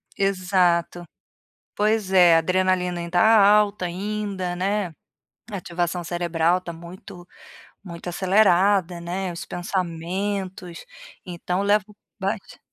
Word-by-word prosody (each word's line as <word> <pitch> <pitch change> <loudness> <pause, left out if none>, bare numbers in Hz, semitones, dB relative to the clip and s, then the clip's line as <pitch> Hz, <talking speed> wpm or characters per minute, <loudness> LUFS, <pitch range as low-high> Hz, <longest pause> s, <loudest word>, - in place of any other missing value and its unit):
Exato, 180 -3 +1 0.7
pois 210 -2 0
é, 175 -3 +6
adrenalina 180 +1 0
ainda 170 +1 -1
alta, 210 -2 +4
ainda, 195 0 -4
né, 190 -1 -1 0.6
ativação 175 -2 -3
cerebral 175 0 0
tá 170 - -7
muito 175 +2 -12 0.6
muito 175 -2 -9
acelerada, 190 -1 +2
né, 180 +1 -4
os 170 - -7
pensamentos, 180 - -4 0.4
então 180 +1 -3
levo 205 -1 +2 0.3
bate 195 +1 -4
185 Hz, 95 wpm, -23 LUFS, 175-195 Hz, 0.7 s, é